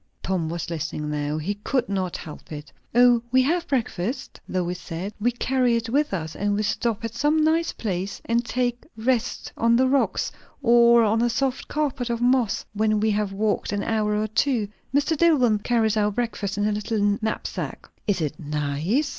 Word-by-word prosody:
Tom 180 -4 -1
was 170 0 -4
listening 155 -2 -3
now. 150 0 -1
He 165 +7 -2
could 240 +4 -1
not 190 -3 -2
help 155 - -10
it. 150 0 -8 0.2
"O, 245 -1 +6
we 260 +1 +5
have 340 +5 0
breakfast," 240 - -2
Lois 180 -1 -2
said. 175 +4 -5
"We 240 - +3
carry 250 0 +1
it 230 0 -2
with 290 +5 +1
us, 160 -4 -3
and 205 0 0
we 210 - 0
stop 225 +2 -1
at 230 - -4
some 295 +6 +2
nice 325 +2 +2
place 195 -2 -3
and 235 +1 +1
take 245 0 -1
rest 240 +1 -1
on 230 0 +3
the 260 +2 +4
rocks, 275 +1 +1 0.3
or 235 -1 +6
on 220 +1 +2
a 240 - +3
soft 265 +3 -1
carpet 280 -5 -1
of 235 -1 -1
moss, 245 -3 +2
when 215 0 +2
we 215 +1 +2
have 205 -1 0
walked 205 +1 -1
an 205 0 -1
hour 215 -2 0
or 210 +1 +1
two. 220 0 +1 0.2
Mr. 290 +4 +2
Dillwyn 280 -10 +4
carries 225 -1 +1
our 210 -1 +2
breakfast 210 -3 -3
in 205 0 +1
a - - +1
little 205 -1 0
knapsack." 220 0 -4 0.2
"Is 195 -4 +1
it 155 0 -3
_nice? 150 - -1
220 Hz, 190 wpm, -24 LUFS, 195-245 Hz, 0.3 s, O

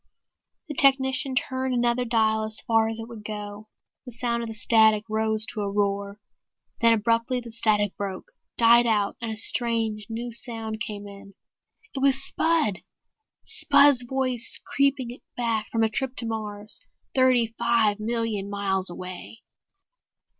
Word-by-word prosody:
The 300 - -5
technician 270 0 +4
turned 260 0 -1
another 240 +1 +1
dial 220 -2 +2
as 215 0 -1
far 225 -2 +2
as 225 0 -3
it 225 0 -6
would 230 -3 -10
go. 210 0 -7 0.4
The - - -7
sound 235 0 -2
of 230 - -4
the 225 - -5
static 220 -1 +4
rose 220 0 +1
to 215 - -4
a 200 - -2
roar. 200 0 -1 0.6
Then 230 0 +5
abruptly 230 +3 0
the 235 -1 -9
static 210 -3 +1
broke, 195 -2 -5 0.3
died 235 +1 +6
out 210 -3 +1
and 230 - -3
a 220 - -5
strange 225 -2 +1
new 235 +2 -5
sound 225 -2 -5
came 205 -1 -4
in. 200 -1 -13 0.6
It 270 - -4
was 270 0 +3
Spud! 275 - 0 0.7
Spud's 285 - +4
voice 255 -1 0
creeping 270 -3 0 0.2
back 230 -3 -1
from 225 -1 +1
a - - +4
trip 260 +3 -3
to 235 - -5
Mars, 215 -2 -3 0.3
thirty 250 -3 +3
five 230 -3 +2
million 220 -3 -2
miles 195 -2 -1
away! 185 +5 -8
225 Hz, 150 wpm, -25 LUFS, 215-245 Hz, 0.7 s, died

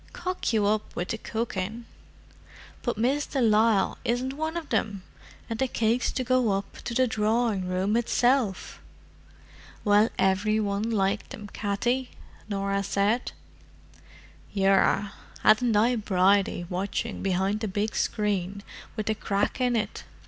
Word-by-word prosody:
'Cock 365 -6 -2
you 215 -3 +2
up 215 +1 0
with 175 - -3
the 225 - -1
cooking!' 220 0 -3 1.0
But 240 -3 -2
Miss 270 +6 +1
de 275 - -2
Lisle 220 -3 +3
isn't 250 +3 -1
one 315 +3 -3
of 325 -4 -6
them—and 205 +2 -4
the 265 - +2
cakes 235 0 +1
to 255 - -1
go 250 -4 +2
up 195 +1 -4
to 235 - -3
the 260 +1 +4
drawing 220 -3 0
room 185 +3 0
itself!" 240 -3 +1 1.0
"Well, 210 +2 +5
every 205 +3 +2
one 205 +1 -1
liked 205 -1 0
them, 205 -1 -8
Katty," 240 +5 -1 0.4
Norah 200 0 -1
said. 200 +4 0 1.2
"Yerra, 195 0 +2 0.3
hadn't 220 +1 +4
I 235 +4 +3
Bridie 195 -3 +2
watching 200 +5 -3
behind 195 +2 0
the 220 - -2
big 205 +3 -2
screen 200 -2 -1 0.3
with 215 -1 -3
the 220 - +1
crack 205 +3 -1
in 245 -1 +2
it?" 220 -1 -2
215 Hz, 135 wpm, -27 LUFS, 200-235 Hz, 1.2 s, Well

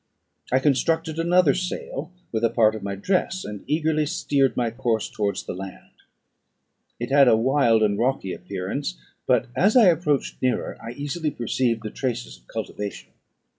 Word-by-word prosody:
I 130 - +4
constructed 160 +4 +1
another 170 -3 +4
sail 175 -3 -4 0.2
with 110 0 -2
a 115 - +4
part 110 -2 +3
of 110 - -6
my 100 0 -3
dress, 185 - -1
and 105 -2 -7
eagerly 155 0 +1
steered 140 -5 +1
my 120 -2 +1
course 115 -2 -1
towards 100 -2 -2
the - - -5
land. 95 +1 -9 1.1
It 120 +2 -4
had 140 -1 +6
a 110 - +6
wild 120 -2 +3
and 100 -1 +1
rocky 120 -7 0
appearance; 90 -10 -4 0.3
but, 125 -1 +3
as 210 +7 +4
I 220 -7 +8
approached 155 -4 0
nearer, 130 -1 0
I 115 +1 -7
easily 145 +4 -3
perceived 120 -3 -1
the 110 - -5
traces 60 - -4
of - - -29
cultivation. 105 -1 -6
125 Hz, 165 wpm, -24 LUFS, 110-155 Hz, 1.1 s, I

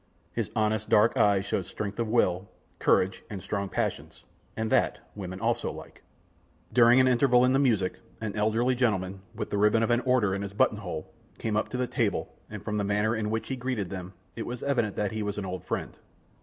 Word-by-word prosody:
His - - -2
honest, 110 0 0
dark 105 +2 +5
eyes 100 -1 +3
showed 95 -3 -2
strength 100 +2 -5
of 115 - 0
will, 100 -4 +1 0.3
courage 95 +1 +2
and 100 - -5
strong 100 +1 -3
passions, - - -3 0.3
and 110 0 -2
that, - - +3 0.2
women 95 -2 -6
also 120 +2 0
like. - - -11 0.7
During 120 +1 +7
an 130 - +5
interval 125 0 +4
in 130 - +3
the 135 - +4
music, 110 -9 +1 0.2
an 110 -2 -4
elderly 110 +4 +2
gentleman, 100 -6 0
with - - -4
the 100 - 0
ribbon 105 +2 +4
of 115 - +1
an 120 - +4
order 125 -7 +2
in 100 - -2
his 100 -1 -5
button 105 0 +2
hole, 90 -7 -6 0.2
came 110 -2 -2
up 110 - 0
to 125 - -4
the 125 - +1
table, - - -1 0.2
and 105 -2 -7
from 105 -1 -1
the 105 - 0
manner 105 +3 +1
in 110 -1 -2
which 110 +1 -2
he 135 - -1
greeted 125 -7 -3
them, 95 -1 -6 0.2
it 115 - -5
was 120 0 -5
evident 120 -7 0
that 105 -2 -1
he 110 - -3
was 105 0 -3
an 100 - -3
old 90 -1 -5
friend. - - -4
105 Hz, 215 wpm, -28 LUFS, 100-120 Hz, 0.7 s, During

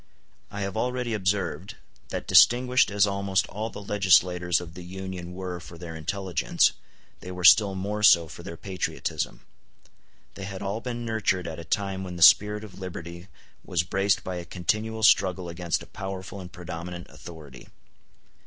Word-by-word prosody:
I 105 0 -6
have 100 -1 -3
already 125 -1 -1
observed 100 -1 -1 0.3
that - - -4
distinguished 125 +1 +5
as 100 0 +3
almost 100 -1 0
all 110 +3 -4
the 105 - -9
legislators 90 -3 +3
of 85 -2 -9
the 90 - -9
Union 90 -1 -7
were 90 -2 -5
for 85 0 -12
their 85 -1 -8
intelligence, 90 +3 +1 0.5
they 90 - -9
were 90 0 -7
still 100 +1 +7
more 100 +3 -3
so 85 -5 +6
for 80 +2 -10
their 85 -2 -8
patriotism. 95 0 -4 0.9
They 95 - -7
had 100 0 -6
all 100 +3 -3
been 120 -1 -5
nurtured 105 -5 0
at 80 0 -6
a - - -7
time 95 +3 -2
when 90 -1 -6
the 85 - +2
spirit 105 +3 +6
of 100 -3 -11
liberty 85 -1 -8 0.4
was 85 -2 0
braced 95 +3 +1
by 95 -1 -4
a 85 - -5
continual 110 +6 -2
struggle 95 -4 +3
against 85 0 -2
a - - -11
powerful 95 0 -7
and 90 -1 -10
predominant 85 0 -7
authority. 75 -4 -12
95 Hz, 165 wpm, -26 LUFS, 85-100 Hz, 0.9 s, still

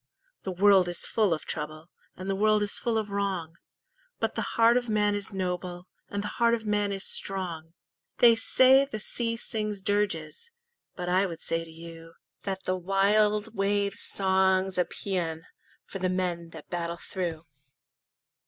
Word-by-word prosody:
The 190 - -4
world 190 0 +4
is 175 -1 0
full 215 -4 +1
of 160 - -2
trouble, 155 +1 -6 0.3
And 185 - -7
the 195 - 0
world 215 +1 +3
is 205 - +2
full 230 -2 -1
of 210 -2 -3
wrong, 190 -5 -3 0.6
But - - -1
the - - -2 0.2
heart 230 +1 +5
of 245 -1 0
man 210 -1 +2
is 205 +1 -2
noble, 180 -1 -4 0.2
And 205 0 -3
the - - -3
heart 235 0 +5
of 225 -1 -8
man 205 -1 0
is 195 -1 -1
strong! 170 -4 -1 0.4
They 235 -1 +7
say 260 +4 +5
the 275 -5 -5
sea 230 +2 -1
sings 210 -4 -3
dirges, 205 - -1 0.5
But 180 -1 -5
I 185 +2 +2
would 165 -2 -7
say 165 0 -1
to 165 - -13
you 165 0 -11 0.3
That 190 -1 -4
the 185 - -1
wild 205 +3 +1
wave's 200 -1 0
song's 190 -1 +3
a 180 - +3
paean 165 -5 -4 0.4
For 195 - -7
the 185 0 0
men 180 -2 -2
that 160 -2 -13
battle 170 -1 -3
through. 170 -3 -5
195 Hz, 170 wpm, -27 LUFS, 175-210 Hz, 0.6 s, They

